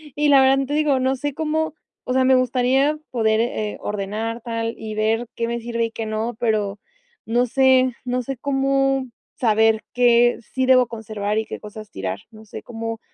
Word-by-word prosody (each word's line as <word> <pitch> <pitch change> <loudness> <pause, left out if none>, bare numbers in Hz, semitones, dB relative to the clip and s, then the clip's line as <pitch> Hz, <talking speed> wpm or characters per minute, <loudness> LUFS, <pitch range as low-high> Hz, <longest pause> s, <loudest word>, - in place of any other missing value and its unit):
Y 295 0 +1
la 275 -1 +7
verdad, 270 +1 +4
te 290 - -3
digo, 295 -3 +2
no 260 +1 +1
sé 290 +2 -3
cómo, 315 +1 -1 0.3
o 255 - -2
sea, 260 0 +3
me 260 0 +5
gustaría 255 +4 +2
poder, 220 -2 +2
eh, 215 -3 -2
ordenar 210 +3 -3
tal 230 -1 -3
y 220 -1 -6
ver 220 +2 0
qué 230 - -2
me 235 0 -2
sirve 230 0 -1
y 230 - -5
qué 225 0 -5
no, 220 +2 -3
pero 210 -3 0 0.5
no 240 +2 +2
sé 260 0 +3
no 250 0 -1
sé 270 +2 -5
cómo 270 0 +1 0.3
saber 220 -1 +2
qué 240 0 +4
sí 260 0 +1
debo 255 -1 +5
conservar 215 -2 -4
y 220 - 0
qué - - -7
cosas 215 0 -10
tirar, 95 0 -4
no 220 0 -14
sé 210 - -9
cómo 225 -1 -5
235 Hz, 190 wpm, -22 LUFS, 220-260 Hz, 0.5 s, la